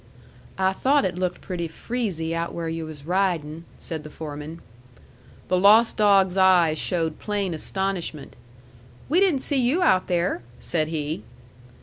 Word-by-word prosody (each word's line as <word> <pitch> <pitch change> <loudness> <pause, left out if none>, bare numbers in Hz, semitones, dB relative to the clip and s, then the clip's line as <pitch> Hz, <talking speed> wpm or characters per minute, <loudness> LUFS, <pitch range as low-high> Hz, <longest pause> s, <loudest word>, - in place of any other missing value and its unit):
"I 190 0 +2
thought 275 +7 +2
it 180 - -1
looked 180 -1 -2
pretty 175 -3 -4
freezy 170 -3 -3
out 165 0 -3
where 170 -1 -3
yu' 165 0 -4
was 145 -2 -10
riding," 170 -3 -1
said 160 -2 -5
the 150 - -9
foreman. 150 +1 -7 0.9
The 185 - +2
lost 215 +4 +6
dog's 195 -3 +4
eyes 175 -5 +4
showed 165 -3 -1
plain 205 -4 -2
astonishment. 180 -2 -3 0.7
"We 330 +6 +4
didn't 360 -9 +3
see 275 -2 0
you 280 +10 +2
out 185 - +3
there," 175 -6 0 0.2
said 155 -2 -1
he. 155 -4 -3
180 Hz, 145 wpm, -24 LUFS, 160-200 Hz, 0.9 s, lost